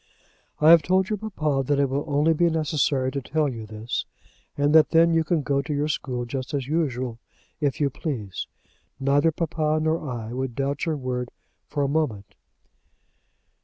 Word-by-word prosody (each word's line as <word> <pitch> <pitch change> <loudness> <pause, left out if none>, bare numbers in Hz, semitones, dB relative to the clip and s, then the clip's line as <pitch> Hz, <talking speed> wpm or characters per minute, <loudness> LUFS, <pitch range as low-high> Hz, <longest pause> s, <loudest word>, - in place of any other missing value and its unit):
"I 155 +2 +7
have 170 -1 +8
told 185 +4 +1
your 215 - 0
papa 155 -10 -1
that 145 +2 +1
it 140 - +3
will 135 +2 -2
only 150 +2 +3
be 170 +2 +3
necessary 145 -4 0
to 140 - -3
tell 150 +3 0
you 115 -5 -5
this, 110 +2 -4 0.5
and 145 +1 +2
that 160 -1 +7
then 165 +1 +5
you 165 0 +3
can 160 -1 0
go 140 0 +1
to 150 - -6
your 145 +2 0
school 125 -4 -2
just 130 +3 -4
as 135 -3 -2
usual, 130 -6 -1 0.4
if 145 -3 0
you 145 -2 +1
please. 115 - -4 0.5
Neither 140 +4 +3
papa 155 -1 0
nor 155 -1 -1
I 115 -2 -5
would 130 -1 -3
doubt 140 +3 -2
your 155 -2 0
word 125 -2 -3 0.4
for 145 -1 -1
a - - +1
moment." 135 -9 -1
145 Hz, 180 wpm, -25 LUFS, 130-160 Hz, 0.5 s, have